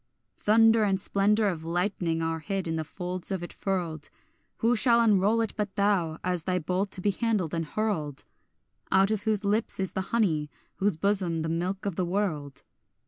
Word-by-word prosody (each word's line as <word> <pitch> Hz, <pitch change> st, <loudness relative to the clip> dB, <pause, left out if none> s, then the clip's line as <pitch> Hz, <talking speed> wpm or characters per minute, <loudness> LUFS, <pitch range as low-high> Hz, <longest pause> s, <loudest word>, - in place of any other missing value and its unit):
Thunder 225 Hz, +1 st, +5 dB
and 195 Hz, -2 st, +1 dB
splendour 205 Hz, +3 st, +2 dB
of 170 Hz, -5 st, -2 dB
lightning 170 Hz, -1 st, -1 dB
are 165 Hz, 0 st, -1 dB
hid 195 Hz, +2 st, -3 dB
in 165 Hz, -, -1 dB
the 160 Hz, -, -1 dB
folds 180 Hz, +3 st, -4 dB
of 190 Hz, -3 st, -2 dB
it 175 Hz, -, -7 dB
furled; 170 Hz, -6 st, -3 dB, 0.5 s
Who 235 Hz, +2 st, +2 dB
shall 235 Hz, +1 st, +4 dB
unroll 215 Hz, 0 st, +3 dB
it 225 Hz, -, -2 dB
but 210 Hz, -2 st, -3 dB
thou, 195 Hz, -6 st, +1 dB
as 180 Hz, -2 st, -1 dB
thy 185 Hz, -1 st, +1 dB
bolt 185 Hz, +4 st, -1 dB
to 185 Hz, -, -3 dB
be 205 Hz, -, +2 dB
handled 205 Hz, -6 st, -1 dB
and 165 Hz, -2 st, -2 dB
hurled, 160 Hz, -9 st, -2 dB, 0.7 s
Out 195 Hz, +2 st, +4 dB
of 210 Hz, -1 st, -2 dB
whose 215 Hz, -2 st, 0 dB
lips 210 Hz, +2 st, 0 dB
is 190 Hz, -3 st, -2 dB
the 190 Hz, -, -1 dB
honey, 160 Hz, -10 st, +1 dB, 0.3 s
whose 200 Hz, -4 st, +1 dB
bosom 180 Hz, -3 st, +1 dB
the 160 Hz, -, -2 dB
milk 180 Hz, +4 st, -2 dB
of 200 Hz, -4 st, -3 dB
the 185 Hz, -, +1 dB
world? 165 Hz, -8 st, -2 dB
190 Hz, 190 wpm, -27 LUFS, 165-210 Hz, 0.7 s, Thunder